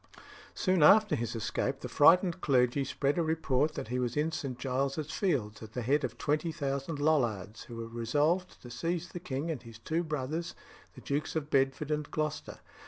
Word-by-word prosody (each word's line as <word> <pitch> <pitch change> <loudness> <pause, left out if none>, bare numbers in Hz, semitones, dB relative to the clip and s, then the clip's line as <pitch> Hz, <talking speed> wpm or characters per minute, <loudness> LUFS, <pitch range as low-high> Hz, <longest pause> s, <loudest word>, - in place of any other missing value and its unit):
Soon 185 -4 +2
after 210 +6 +7
his 115 0 -3
escape, 120 +4 -2
the - - -4
frightened 175 +3 +5
clergy 130 0 +2
spread 140 +4 0
a - - +3
report 155 -2 +1
that - - -5
he 125 +1 -1
was 125 +1 -2
in 155 +2 +1
St. 135 -5 -4
Giles's 135 +4 -2
Fields, 125 - -1
at 110 -1 -10
the 125 - -3
head 140 +5 +2
of 120 -2 -3
twenty 155 +3 0
thousand 140 -1 -3
Lollards, 120 -9 0
who 120 - -9
were 115 0 -5
resolved 145 +11 0
to 120 - -10
seize 165 +7 -2
the 175 - -6
king 155 -1 -3
and 150 - -4
his 115 -2 -12
two 160 +8 -1
brothers, 155 +2 -3 0.4
the - - -11
Dukes 145 +3 -2
of 150 -2 -3
Bedford 135 +2 +1
and 150 -1 -1
Gloucester. 155 0 -3
145 Hz, 190 wpm, -31 LUFS, 125-160 Hz, 0.4 s, after